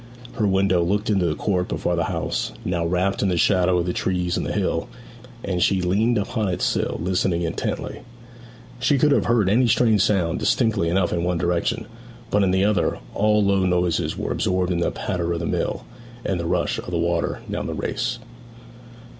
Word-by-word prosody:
Her 110 -4 0
window 95 -2 +2
looked 105 +5 0
into 95 -4 +2
the 75 - -1
court 90 -5 -1
before - - -1
the - - 0
house, - - -2
now 85 -2 -1
wrapped 90 +3 0
in 100 - +2
the 90 - 0
shadow 90 0 +3
of 85 - 0
the 90 - -1
trees 90 -1 -1
and - - -1
the - - -3
hill; - - -1 0.5
and 90 -2 -2
she 95 +1 +3
leaned 105 +7 +1
upon 105 +1 -1
its 90 - -1
sill - - 0
listening 90 -1 0
intently. 85 0 -3 0.8
She 140 +3 +2
could 150 +3 +3
have - - +3
heard 115 -5 +2
any 120 +6 +3
strange 110 -2 +3
sound 90 -5 +1
distinctly 105 -7 +1
enough 90 0 +1
in 85 -1 -1
one 90 0 0
direction; 90 +7 -1 0.5
but 105 - +3
in 95 - +3
the 95 +1 +2
other 105 -1 +1 0.2
all 105 0 +3
low 100 -1 +2
noises 90 -2 0
were - - -3
absorbed 90 0 0
in 85 - 0
the 85 - +1
patter 85 -1 -2
of 85 - -2
the 85 - -3
mill, - - -2 0.4
and 95 -3 -1
the 85 - -3
rush - - 0
of - - -9
water 85 0 -1
down - - -3
the - - -4
race. - - -2
95 Hz, 195 wpm, -23 LUFS, 90-105 Hz, 0.8 s, shadow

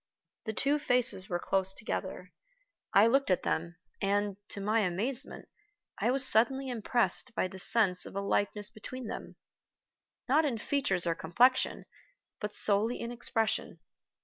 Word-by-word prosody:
The 220 - -3
two 280 +6 +1
faces 245 -8 +1
were 175 - -1
close 190 +1 0
together; 185 -3 -5 0.6
I 200 +2 +6
looked 270 +3 +2
at 185 - +1
them, 170 +1 -2 0.3
and, 200 0 0
to - - -3
my 215 +3 +1
amazement, 220 +8 -2 0.5
I - - +1
was 260 0 +4
suddenly 265 +5 +3
impressed 240 +1 0
by - - 0
the 190 +1 -11
sense 195 -3 +2
of - - -12
a - - -1
likeness 205 +1 +1
between 245 +3 -8
them - - -7 0.9
not 295 +5 +3
in 270 -6 -1
features 215 -7 0
or 170 - +1
complexion, 235 +11 +1 0.5
but 210 0 -5
solely 215 +4 +1
in 235 - -5
expression. 230 -2 -2
215 Hz, 150 wpm, -30 LUFS, 195-250 Hz, 0.9 s, I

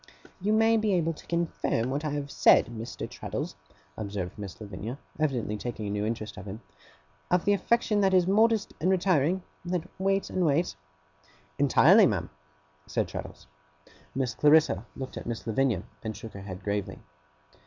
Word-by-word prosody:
'You 200 +3 0
may 225 +1 +4
be 215 -3 +2
able 165 -1 +1
to - - -15
confirm 165 -8 -1
what 145 +3 -2
I 155 - -1
have 145 -1 -3
said, - - +6
Mr. 115 0 -6
Traddles,' - - -5 0.4
observed 100 -4 -4
Miss 100 -1 -8
Lavinia, 105 +4 -6 0.2
evidently 130 -8 0
taking 110 -1 -5
a 100 - -3
new 105 +1 -1
interest 110 -2 -4
in 105 - -8
him, 105 +3 -7 0.7
'of 180 -1 +2
the 205 - +4
affection 215 0 +2
that 195 -1 +4
is 185 -2 +4
modest 220 +2 +3
and 180 - +2
retiring; 185 -2 +2 0.2
that 175 -1 -2
waits 195 +1 +1
and 185 - 0
waits?' 165 +2 +1 0.8
'Entirely, - - +6
ma'am,' - - -2 0.6
said - - 0
Traddles. - - -7 0.7
Miss 130 -3 0
Clarissa 150 - +4
looked 130 -1 -6
at - - -7
Miss 120 -2 -4
Lavinia, 115 -4 +1 0.2
and 110 -2 -5
shook 115 -1 -9
her 100 - -8
head 95 -1 -8
gravely. 100 0 -2
140 Hz, 165 wpm, -28 LUFS, -, 0.8 s, said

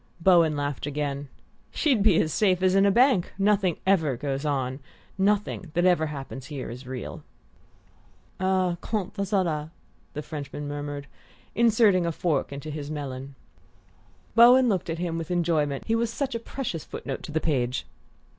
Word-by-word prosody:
Bowen 170 -4 +4
laughed 145 0 -3
again. 145 -1 -3 0.4
"She'd 270 -9 +1
be 200 -5 +5
as 155 -1 -1
safe 185 -3 +2
as 185 0 +4
in 195 +1 +5
a - - +4
bank! 240 -4 +3
Nothing 195 -3 +2
ever 160 -9 +2
goes 140 +2 -3
on! 135 -2 -1 0.4
Nothing 200 -2 0
that 175 +1 +2
ever 175 -4 +3
happens 135 -3 -7
here 140 -6 -6
is 125 +2 -9
real." 130 -1 -6 1.2
"Ah, 185 -2 +1
quant 210 -4 -3
à 200 -1 -3
cela 165 -6 0 0.2
" - - -36
the 150 - -4
Frenchman 145 -1 -6
murmured, 145 -1 -5 0.5
inserting 220 -6 +4
a - - +1
fork 155 -4 -1
into 140 +2 -6
his 145 -1 -5
melon. 140 -2 -6 1.0
Bowen 245 +2 +7
looked 190 -5 -1
at 165 - -2
him 170 -1 -2
with 165 - -6
enjoyment 160 -5 0
he 225 - 0
was 230 0 +1
such 275 +2 -2
a 230 - -2
precious 230 - -5
foot - - -9
note 135 - -4
to - - -8
the 160 - +1
page! 130 -6 -1
165 Hz, 170 wpm, -26 LUFS, 145-195 Hz, 1.2 s, Bowen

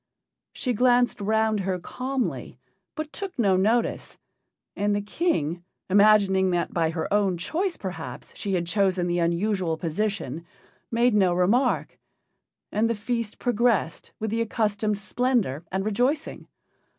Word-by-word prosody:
She 250 - -2
glanced 245 0 +3
round 220 +1 +1
her 190 -1 -1
calmly, 255 +8 -4 0.4
but 310 -1 -5
took 390 -2 -6
no 200 -6 +3
notice; 220 +5 0 0.6
and 205 0 +1
the 205 - 0
King, 175 - -1 0.3
imagining 200 -2 +5
that 175 -1 -1
by 165 -2 +1
her 160 0 -3
own 200 -4 +2
choice 345 - -2
perhaps, 190 -2 -7
she 200 - -3
had 175 -1 0
chosen 185 0 +1
the 175 0 0
unusual 170 0 0
position, 170 -3 -2 0.5
made 235 +1 +2
no 190 -4 +3
remark. 225 +9 +1 0.7
And 220 +2 +1
the 230 - 0
feast 225 +1 -3
progressed 235 -7 0
with 220 -1 -2
the 230 +1 0
accustomed 210 -2 0
splendor 210 - 0
and 190 +1 -1
rejoicing. 250 +9 -1
205 Hz, 135 wpm, -25 LUFS, 185-235 Hz, 0.7 s, imagining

